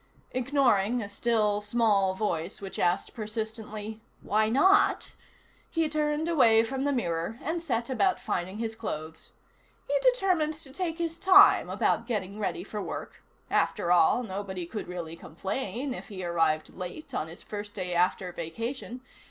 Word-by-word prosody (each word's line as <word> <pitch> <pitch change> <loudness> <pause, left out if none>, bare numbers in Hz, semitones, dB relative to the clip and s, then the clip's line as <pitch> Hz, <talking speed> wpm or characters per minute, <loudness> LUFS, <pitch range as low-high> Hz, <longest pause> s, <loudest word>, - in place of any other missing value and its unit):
Ignoring 250 -4 +2
a - - -5
still, 210 0 +1
small 205 -3 +2
voice 180 -4 -2
which 195 -1 -7
asked 175 0 +1
persistently: 220 0 -5 0.2
"Why 215 +1 +2
not?" 380 - +4 0.6
he 330 -1 +1
turned 300 +1 0
away 230 -9 +5
from 265 +3 -2
the 285 - +2
mirror 175 -4 -1
and 330 +2 -2
set 235 -8 -1
about 370 +9 +1
finding 185 +3 -3
his 225 0 -3
clothes. 160 -8 -6 0.6
He - - 0
determined 375 -11 +2
to 295 -4 -12
take 335 -1 -2
his 330 -1 -3
time 385 +1 +7
about - - +1
getting 205 -3 -3
ready 195 -4 -2
for 210 +1 -5
work: - - -6 0.3
after 175 - +1
all, 180 +8 +5
nobody 190 -3 -5
could 210 +5 -6
really 170 -2 -6
complain 250 - -4
if - - -8
he 185 -4 -6
arrived 165 -2 +1
late 195 - -7
on 155 - -2
his 165 - -10
first 205 0 -7
day 180 -2 -3
after 180 +1 +1
vacation. 230 - -5
220 Hz, 150 wpm, -28 LUFS, 185-270 Hz, 0.6 s, time